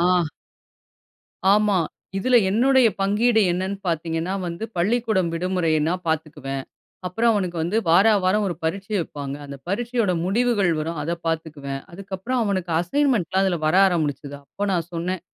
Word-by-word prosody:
ஆ, - - +3 1.5
ஆமா. 210 -1 +3 0.4
இதுல 250 +6 +2
என்னுடைய 255 +3 +4
பங்கீடு 220 +4 +3
என்னன்னு 190 +3 -2
பாத்தீங்கன்னா 165 +2 -1
வந்து, 170 +5 -5
பள்ளிக்கூடம் 215 -1 +1
விடுமுறைன்னா, 165 -2 +1
பாத்துக்குவேன். 145 -4 -3 0.4
அப்புறம் 225 +6 +2
அவனுக்கு 185 -5 -1
வந்து 175 +6 -1
வார 180 +6 +6 0.2
வாரம் 210 +3 +2
1 175 - -3
பரீட்சை 195 +6 -2
வப்பாங்க. 145 -4 -5
அந்த 140 0 -8
பரீட்சையோட 230 -1 0
முடிவுகள் 205 -1 +2
வரும். 160 +1 -3
அத 165 +3 -2
பாத்துக்குவேன். 155 -4 -3
அதுக்கப்புறம் 195 +7 -3
அவனுக்கு 185 -4 -1
அசைன்மென்ட்லாம் 195 - +1
அதில 180 -3 +1
வர 155 +4 +3
ஆரம்பிச்சுது. 145 -4 -2
அப்ப 205 +8 -4
நான் 170 -2 -1
சொன்னேன். 175 +1 -2
185 Hz, 135 wpm, -23 LUFS, 165-210 Hz, 1.5 s, வார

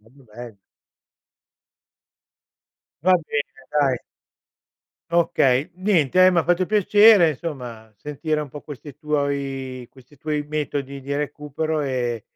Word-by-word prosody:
proprio 125 +5 -22
belli. 115 0 -11 2.5
Va 185 +2 +4
bene 145 -2 -4
dai. 140 -4 +1 1.1
Okay. 145 -5 +2
Niente, 185 -3 +3
ehm, 185 -1 +5
m'ha 170 - +2
fatto 175 +1 +1
piacere 210 -3 +5
insomma, 125 -8 -7
sentire 150 - -3
un 150 - -6
po' 145 +2 -9
questi 145 0 -10
tuoi 140 -4 -3
questi 130 +2 -19
tuoi 150 +1 -3
metodi 140 -2 -3
di 140 +2 -6
recupero 150 +1 -3
e 125 -5 -2
145 Hz, 110 wpm, -22 LUFS, 130-160 Hz, 2.5 s, ehm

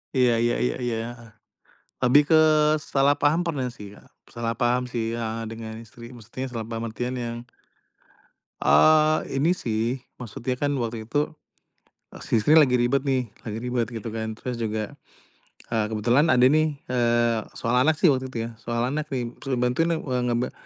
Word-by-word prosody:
Iya 125 -2 +4
iya 120 - +2
iya - - -1
iya. 120 -2 -1 0.2
Heeh. 115 -1 -14 0.7
Lebih 130 +4 +6
ke, 160 - +7 0.6
salah 140 +1 +4
paham 150 +4 +3
pernah 140 -6 -1
sih 100 -1 -10
ya, - - -16 0.3
salah 115 -1 -2
paham 120 +1 +2
sih 115 -2 -1
heeh, 115 0 -3
dengan 110 -1 -7
istri. 115 +2 -14
Maksudnya, 120 +3 -7
salah 115 -2 -4
paham, 115 0 -4
artian 125 +3 -4
yang 120 0 -4 1.3
eee, 155 0 +5 0.2
ini 145 +6 +2
sih. 115 -6 -1 0.2
Maksudnya 125 +1 -4
kan, 145 +3 -1
waktu 115 -1 -3
itu 145 +8 -1 0.9
si 115 - +1
istri 145 +8 +3
lagi 135 -6 +6
ribet 125 +3 +2
nih, 130 -3 0 0.2
lagi 110 -1 -5
ribet 120 0 -1
gitu 115 -2 -7
kan. 110 0 -4
Terus 125 - -4
juga 110 -2 -3 0.8
eee, 110 -2 +1
kebetulan 120 +7 +2
ada 125 -5 +4
nih, 155 +3 +4 0.2
eee, 120 -2 +2 0.2
soal 120 +2 +1
anak 155 +5 +3
sih 155 +1 +4
waktu 130 -1 -1
itu, 120 -3 -4
ya, - - -8
soal 115 +1 -2
anak 150 +1 -3
nih. 125 -4 -3
Suruh 135 -1 -2
bantuin 125 +6 +1
na 170 - +1
wa 130 -3 -1
ngeba 125 0 -1
125 Hz, 175 wpm, -25 LUFS, 115-135 Hz, 1.3 s, ke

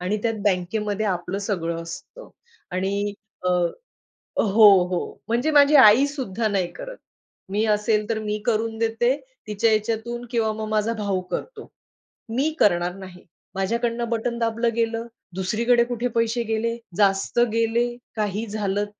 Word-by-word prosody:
आणि 185 +4 -1
त्यात 230 -1 0
बँकेमध्ये 205 +2 0
आपलं 180 0 -2
सगळं 170 -5 -2
असतं. - - -10 0.4
आणि 200 +2 -1 0.3
अ, 180 - +2 0.9
हो, 215 +1 +6 0.2
हो. 180 -1 -3
म्हणजे 240 +7 +1
माझी 290 0 +6
आईसुद्धा 250 -3 +5
नाही 195 -4 0
करत. - - -8 0.5
मी 205 +3 0
असेल 210 0 +1
तर 225 -1 0
मी 210 -1 -2
करून 225 -1 0
देते 230 +3 +1 0.3
तिच्या 215 +2 +1
याच्यातून 225 +2 -1
किंवा 225 -3 +1
मग 215 0 -5
माझा 215 +1 +1
भाऊ 200 -4 -2
करतो. 450 -3 -5 0.7
मी 285 +5 +2
करणार 175 -2 +3
नाही, 185 -2 -11 0.3
"माझ्याकडून 235 +5 -1
बटन 235 +1 -1
दाबलं 230 0 0
गेलं, 230 0 -1 0.3
दुसरीकडे 235 +6 +2
कुठे 245 0 -2
पैसे 230 +1 +1
गेले? 225 +1 -1 0.2
जास्त 195 +2 +2
गेले? 230 +1 +2 0.3
काही 210 0 -2
झालं?" 205 -1 -1
220 Hz, 135 wpm, -23 LUFS, 200-235 Hz, 0.9 s, हो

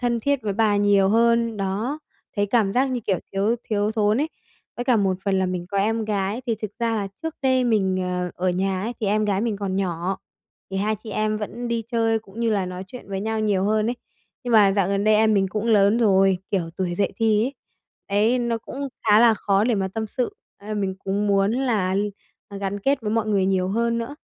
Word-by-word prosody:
thân 240 -1 0
thiết 280 +2 0
với 205 -2 -1
bà 215 0 +2
nhiều 205 -1 +4
hơn, 230 0 +3
đó, 205 +9 -2 0.4
thấy 205 0 +2
cảm 210 -2 +2
giác 255 +5 +2
như 250 - -2
kiểu 195 -5 0
thiếu 205 +5 +1
thiếu 210 0 0
thốn 215 +2 +2
ấy. 310 - 0 0.5
Với 245 - -3
cả 245 -2 +3
một 195 -3 +1
phần 195 -1 +1
là 190 - +1
mình 180 -1 -3
có 200 -1 -1
em 220 +2 +1
gái, 205 +2 -2
thì 230 - +1
thực 215 - -3
ra 230 -1 0
là 200 -2 -2
trước 320 -1 -3
đây 260 -1 +3
mình, 190 -5 +1
ờ, 180 -1 -2
ở 185 +1 0
nhà 190 +1 -1
ấy 230 +4 -2
thì 215 - -1
em 215 +1 +2
gái 200 -1 0
mình 225 -3 -1
còn 195 -2 -3
nhỏ, 185 0 -2 0.5
thì 195 - -3
hai 210 +2 0
chị 215 +1 -10
em 215 +1 0
vẫn 230 +3 -5
đi 235 -1 -1
chơi 225 -1 +2
cũng 215 +1 -11
như 230 - +1
là 200 -3 0
nói 180 +1 -6
chuyện 250 -3 -11
với 195 -1 -3
nhau 220 +1 -2
nhiều 200 -3 +1
hơn 215 +1 +1
ấy. 245 - -4 0.5
Nhưng 245 - -2
mà 205 -3 +6
dạo 195 -2 +1
gần 200 0 0
đây 215 0 +5
em 215 0 +4
mình 195 -1 +2
cũng 215 +3 -3
lớn 210 -1 +4
rồi, 195 -4 +4
kiểu 175 -5 -1
tuổi 180 -2 -1
dậy 200 +2 0
thì 220 -1 +2
ấy, 270 +3 -3 0.8
đấy, 255 - +2
nó 235 -1 -1
cũng 275 +5 -6 0.2
khá 210 0 +6
là 230 -2 +6
khó 200 0 +1
để 235 -1 +2
mà 190 -1 -1
tâm 220 +3 -4
sự 260 - -3 0.2
ấy, 215 +1 -6
mình 195 -2 -1
cũng 200 +2 0
muốn 200 +1 +2
là 220 -8 0 0.6
gắn 200 0 -3
kết 275 +5 +1
với 215 -2 -3
mọi 225 0 0
người 200 -3 +2
nhiều 185 -1 +1
hơn 230 +3 0
nữa. 235 +5 -5
210 Hz, 240 wpm, -23 LUFS, 195-230 Hz, 0.8 s, mà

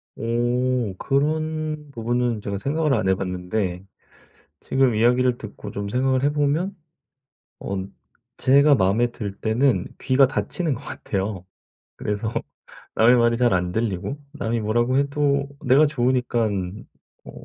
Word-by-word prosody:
오. 120 -1 0
그런 155 +2 -1
부분은 120 -2 -1
제가 100 -1 -3
생각을 150 +5 0
안 95 - +1
해 95 - +4
봤는데 90 0 -3 0.7
지금 130 -3 +2
이야기를 125 +2 +3
듣고 105 -1 -9
좀 100 0 -4
생각을 130 +2 +1
해 145 - +3
보면 150 +7 0 0.8
언 95 0 -5 0.4
제가 140 +2 +5
마음에 105 +3 +2
들 100 -5 -6
때는 120 +6 +1
귀가 130 0 +4
닫히는 155 +3 -2
것 - - -9
같아요. 95 -2 -4 0.5
그래서 105 +2 -3 0.6
남의 120 +3 +5
말이 120 0 +3
잘 120 -3 +2
안 90 -1 0
들리고 110 +5 -2
남이 115 -6 -2
뭐라고 120 +5 +1
해도 140 0 +1 0.2
내가 140 +4 +5
좋으니깐 120 -7 -1 0.4
어 - - -10
120 Hz, 260 characters per minute, -23 LUFS, 105-140 Hz, 0.8 s, 제가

